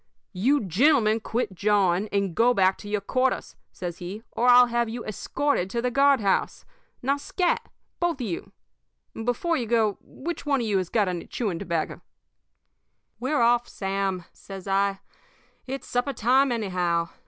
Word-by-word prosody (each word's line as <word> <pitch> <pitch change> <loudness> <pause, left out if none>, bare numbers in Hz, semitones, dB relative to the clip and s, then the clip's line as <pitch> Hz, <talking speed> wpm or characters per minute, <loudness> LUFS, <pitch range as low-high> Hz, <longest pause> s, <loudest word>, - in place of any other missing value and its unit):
"'You 255 +10 +2
gentlemen 225 - +3
quit 225 -1 -2
jawing 200 0 +2
and 200 -3 0
go 240 +6 +3
back 190 -1 +4
to 205 - -9
your 210 -1 -1
quarters,' 255 +5 -1 0.2
says 175 -2 -6
he, 190 +5 -7
'or 245 - 0
I'll 245 0 +8
have 235 -1 0
you 235 +1 -6
escorted 215 -1 -1
to 235 - -2
the 250 +1 0
guard 275 0 +4
house. 195 -2 0 0.4
Now, 275 +3 +1
scat, 355 +5 -1 0.3
both 345 -1 +1
of 250 - -2
you! 175 -6 -5 0.6
Before 245 +9 -1
you 240 - -3
go, 220 -3 +1
which 340 +5 -6
one 280 -2 +1
of 235 - -1
you 205 -3 +1
has 185 -2 -3
got 210 -4 +2
any 180 -2 -4
chewing 200 -9 -3
tobacco?' 165 -2 -3 1.2
"'We're 265 +3 0
off, 240 +1 +3
Sam,' 195 -2 -2
says 195 -1 -10
I. 195 0 +1 0.7
'It's 270 +1 -5
supper 245 +3 -1
time, 255 +3 +3
anyhow. 180 -6 0
220 Hz, 165 wpm, -25 LUFS, 195-250 Hz, 1.2 s, I'll